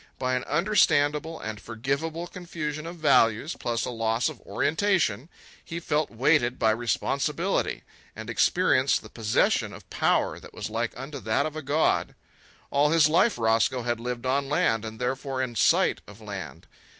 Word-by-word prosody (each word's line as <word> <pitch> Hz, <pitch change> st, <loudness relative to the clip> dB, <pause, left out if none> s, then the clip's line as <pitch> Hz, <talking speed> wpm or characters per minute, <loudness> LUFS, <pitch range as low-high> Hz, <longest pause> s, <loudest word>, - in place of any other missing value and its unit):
By 130 Hz, -1 st, -1 dB
an 125 Hz, -1 st, 0 dB
understandable 160 Hz, -3 st, +2 dB
and 110 Hz, -1 st, -6 dB
forgivable 140 Hz, +9 st, -3 dB
confusion 165 Hz, -4 st, -5 dB
of 170 Hz, -, -7 dB
values, 150 Hz, -3 st, +3 dB
plus 115 Hz, -1 st, -1 dB
a -, -, -4 dB
loss 115 Hz, +3 st, 0 dB
of 155 Hz, -, -11 dB
orientation, 160 Hz, -, 0 dB, 0.3 s
he 165 Hz, 0 st, -5 dB
felt 150 Hz, -2 st, 0 dB
weighted 125 Hz, +1 st, +2 dB
by 110 Hz, -, +3 dB
responsibility, 115 Hz, 0 st, -1 dB, 0.3 s
and 110 Hz, 0 st, -8 dB
experienced 130 Hz, -, +2 dB
the -, -, -12 dB
possession 110 Hz, -2 st, +1 dB
of -, -, -12 dB
power -, -, +1 dB
that -, -, -14 dB
was -, -, -5 dB
like 115 Hz, +1 st, -2 dB
unto 140 Hz, +2 st, -6 dB
that 110 Hz, -2 st, 0 dB
of 155 Hz, 0 st, -4 dB
a 155 Hz, -, -4 dB
god. 145 Hz, +3 st, +1 dB, 0.6 s
All 145 Hz, +1 st, +3 dB
his 160 Hz, -1 st, +5 dB
life 175 Hz, +8 st, +3 dB
Roscoe 115 Hz, +2 st, +2 dB
had 120 Hz, -1 st, -1 dB
lived 120 Hz, +1 st, -4 dB
on 135 Hz, +2 st, 0 dB
land, 115 Hz, -6 st, +1 dB
and 110 Hz, 0 st, -7 dB
therefore 130 Hz, +2 st, -2 dB
in 130 Hz, -2 st, -2 dB
sight 115 Hz, -, +3 dB
of 105 Hz, +1 st, -13 dB
land. 100 Hz, -3 st, -8 dB
130 Hz, 160 wpm, -26 LUFS, 115-155 Hz, 0.6 s, his